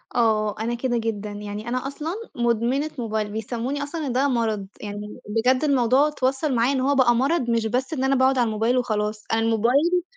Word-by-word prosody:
آه، 215 -3 +2
أنا 235 +2 -1
كده 240 0 -1
جدًا 220 -2 -3
يعني 205 +2 -6
أنا 255 +2 -2
أصلًا 300 +4 -4 0.2
مدمنة 240 +5 0
موبايل، 220 -2 -2
بيسموني 240 +6 -3
أصلًا 300 +1 -4
إن - - -1
ده 265 +3 +2
مرض، 225 -6 -1
يعني 205 0 -7
بجد 250 +5 +2
الموضوع 270 -1 +3
اتوصّل 270 0 0
معايا 235 +3 +3
إن 265 - 0
هو 280 +2 +2
بقى 245 -3 +4
مرض 265 +1 +1
مش 230 -1 +1
بس 255 +6 -1
إن 265 -4 -2
أنا 270 +1 +3
باقعد 260 0 +3
على 245 - +3
الموبايل 225 +3 +1
وخلاص، 215 -3 -1
أنا 225 - +2
الموبايل 255 +11 +2
240 Hz, 195 wpm, -23 LUFS, 220-270 Hz, 0.2 s, بقى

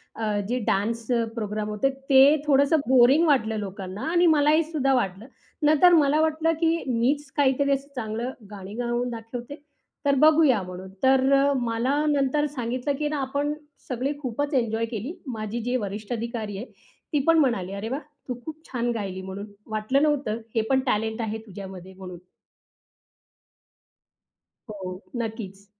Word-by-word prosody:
अ, 225 - -3 0.2
जे 250 - 0
dance 225 +4 0 0.3
programme 215 -1 -3
होते. 210 +6 +1
ते 270 0 +2 0.3
थोडंसं 285 +2 +4
बोरिंग 265 +5 +6
वाटलं 225 -7 +2
लोकांना 195 0 -6
आणि 350 0 +4
मलाही 310 0 +4
सुद्धा 275 -4 +2
वाटलं. 200 -4 -1 0.4
नंतर 310 +4 +6
मला 300 -1 +4
वाटलं, 320 +1 +1
"की 330 0 +2
मीच 270 +5 0
काहीतरी 280 0 +3
असं 275 0 0
चांगलं 230 +2 -3 0.2
गाणी 200 0 -8
गाऊन 240 +1 -1
दाखवते." 235 +3 -7 0.5
तर 280 -1 +4
बघूया 310 -8 +5
म्हणून. 185 +1 -8
तर 260 0 +5 0.4
मला 235 +4 0
नंतर 290 0 +2
सांगितलं 255 +3 -2
की 300 - 0
ना 300 - -2
आपण 285 +2 -1 0.4
सगळी 260 +3 -1
खूपच 285 +3 -2
एन्जॉय 230 -3 +1
केली. 230 - -5 0.2
माझी 215 +2 -4
जी 250 - 0
वरिष्ठ 205 +3 -5
अधिकारी 225 -3 -4
आहे. 230 - -5 0.5
ती 295 - +3
पण 330 0 +6
म्हणाली, 235 -10 +1
"अरे 220 - -4
वाह! 275 +5 -3 0.3
तू 250 - -2
खूप 315 -1 -6
छान 240 -1 0
गायली 190 -3 -4
म्हणून, 190 +2 -7 0.2
वाटलं 215 +7 +1
नव्हतं 285 -7 0
हे 225 - +3
पण 265 -1 +4
टॅलेंट 220 0 0
आहे 220 0 -2
तुझ्यामध्ये 190 -2 -9
म्हणून." 185 -1 -9 2.5
हो, 190 -2 -7 0.2
नक्कीच. 205 -3 -6
240 Hz, 150 wpm, -25 LUFS, 215-280 Hz, 2.5 s, बोरिंग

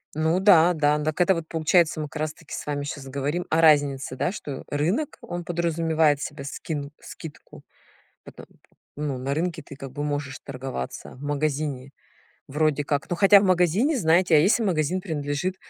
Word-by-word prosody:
Ну 160 +3 +1
да, 180 -3 +6
да. 150 -1 +1
Так 155 +2 -2
это 190 +2 +5
вот 165 -1 -5
получается, 160 0 +2
мы 155 - -3
как 150 +1 -7
раз 155 0 -2
таки 160 -1 -13
с - - -5
вами 145 -1 -3
сейчас 140 -1 -6
говорим 140 +6 -2
о 160 +1 +2
разнице, 145 -4 +3
да? 175 - -1
Что 145 -9 -7
рынок, 175 - -1
он 175 0 -6
подразумевает 160 -3 +1
себе 145 -1 -6
скин 145 +1 -5
скидку 160 -3 -11 0.6
потом, - - -12 0.5
ну, 145 -3 -2
на 135 +2 -2
рынке 165 +1 -2
ты 140 - -12
как 135 -1 -8
бы 145 +1 -4
можешь 145 -2 -3
торговаться, 130 - -6
в 130 - -15
магазине 145 -2 -2 0.6
вроде 150 0 0
как. 145 0 -2
Ну, 175 - 0
хотя 200 +3 +7
в - - 0
магазине, 185 - +2
знаете, 170 -2 +3
а - - +7
если 200 +8 +3
магазин 175 -2 0
принадлежит, 155 0 -3
155 Hz, 180 wpm, -25 LUFS, 145-170 Hz, 0.6 s, хотя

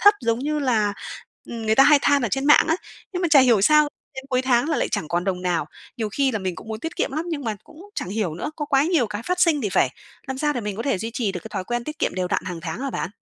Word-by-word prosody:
thấp 410 +1 +7
giống 230 0 0
như 300 +3 -1
là, 225 -7 +1 0.6
ừm, 230 -2 -6
người 220 - +3
ta 270 - +7
hay 295 0 +7
than 285 -1 +3
ở 235 - 0
trên 270 +4 -1
mạng 295 +1 +6
á, 325 - +3 0.4
nhưng 360 -1 -3
mà 345 - +2
chả 290 -3 +8
hiểu 240 -6 +4
sao 300 +6 +5 0.3
đến 265 0 -7
cuối 255 -1 +1
tháng 255 +1 +2
là 315 - +1
lại - - 0
chẳng 155 - -2
còn 175 +1 -1
đồng 185 -2 -2
nào. 175 -4 0 0.3
Nhiều 220 -2 -2
khi 270 +5 +1
là 220 - -1
mình 185 -2 -3
cũng - - -11
muốn 220 -1 -5
tiết 325 - -5
kiệm - - -1
lắm, 315 +4 -2
nhưng 295 -5 -3
mà 220 -3 -2
cũng 365 +6 -15
chẳng - - -4
hiểu 195 -5 -2
nữa, 175 - -4
có 300 - -2
quá 275 0 +3
nhiều 315 -8 +2
cái 210 +1 -5
phát 360 +7 -2
sinh 320 -5 +4
thì 210 - -1
phải. - - +2 0.4
Làm 265 -1 -4
sao 295 0 +1
để 245 - -3
mình 210 -2 -4
có 230 - -3
thể 270 -6 0
duy 225 +4 -4
trì 220 -6 -1
được 180 - -5
cái 220 - -10
thói 190 -3 -4
quen 240 +3 -3
tiết 305 +3 -7
kiệm - - 0
đều 180 -1 -1
đặn - - -1
hàng 175 -3 -5
tháng - - -5
hả 275 0 -2
bạn? 185 - -3
245 Hz, 315 wpm, -23 LUFS, 210-295 Hz, 0.6 s, chả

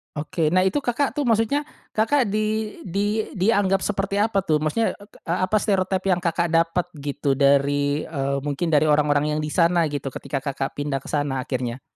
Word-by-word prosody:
Oke. 155 +1 -1
Nah 185 - +5
itu 190 +8 +1
Kakak 275 0 0
tuh 290 - 0
maksudnya, 230 +5 +1 0.2
Kakak 225 +2 +1
di 215 +1 -1
di 205 +4 -1
dianggap 195 -1 +2
seperti 200 0 -2
apa 200 -3 +1
tuh 155 -3 +1
maksudnya 155 +9 0
e 205 - -15
ke - - -19
apa 185 +4 0
stereotipe 190 -3 0
yang 180 - -2
Kakak 170 -1 0
dapat 165 +1 +2 0.2
gitu 145 0 -1
dari, 140 +1 +2
eee, 140 -3 -2
mungkin 145 +4 -1
dari 150 -1 +4
orang-orang 150 0 +2
yang 150 - -1
di 150 - -3
sana 170 0 +2
gitu 140 -2 -4
ketika 140 0 -4
Kakak 135 0 -4
pindah 145 -2 -2
ke - - -11
sana 145 -3 -1
akhirnya? 130 -2 -3
165 Hz, 185 wpm, -23 LUFS, 145-200 Hz, 0.2 s, Nah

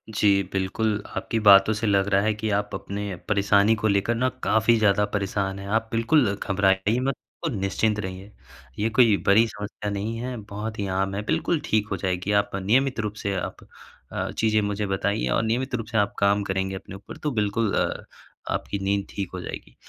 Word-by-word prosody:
जी, 100 -2 +4
बिल्कुल। 105 +2 0 0.2
आपकी 115 - -1
बातों 100 +2 +8
से 110 +1 -2
लग 100 -1 +2
रहा 100 0 +3
है 110 0 +1
कि 105 +1 -3
आप 105 0 -2
अपने 100 -1 -4
परेशानी 100 +1 +4
को 110 0 -1
लेकर 100 +3 +1
ना 130 +2 +1
काफ़ी 110 +2 +3
ज़्यादा 105 -1 +3
परेशान 100 0 -1
हैं। 100 - -8
आप 110 +2 0
बिल्कुल 115 -1 +3
घबराइए 100 +3 +1
मत 135 +1 -1 0.3
और 160 - 0
निश्चिंत 105 +1 0
रहिए, 95 +1 -6 0.5
ये 110 +2 +1
कोई 110 -3 +4
बड़ी 110 +4 +6
समस्या 105 0 -6
नहीं 105 +3 -3
है, 125 +1 -4
बहुत 105 +1 -6
ही 100 - -1
आम 95 0 -1
है, 105 - -2
बिल्कुल 170 -3 0
ठीक 105 -1 +1
हो - - 0
जाएगी। 95 +1 -2
आप 100 - -15
नियमित 120 +7 +1
रूप 105 -1 -2
से 100 -1 0
आप 90 - -5 0.5
अ, - - -3
चीज़ें 110 -1 +2
मुझे 105 0 -2
बताइए 100 +2 -1
और 115 - +1
नियमित 125 +4 -1
रूप 115 -2 -3
से 110 - -2
आप 100 -1 +2
काम 100 +1 +3
करेंगे 95 0 -2
अपने 95 0 -9
ऊपर, 100 - -11
तो 150 - -2
बिल्कुल 105 -1 0
अ, - - -1 0.5
आपकी 100 - -3
नींद 100 0 0
ठीक 100 -3 -4
हो 90 - -4
जाएगी। - - -8
105 Hz, 200 wpm, -25 LUFS, 100-110 Hz, 0.5 s, बातों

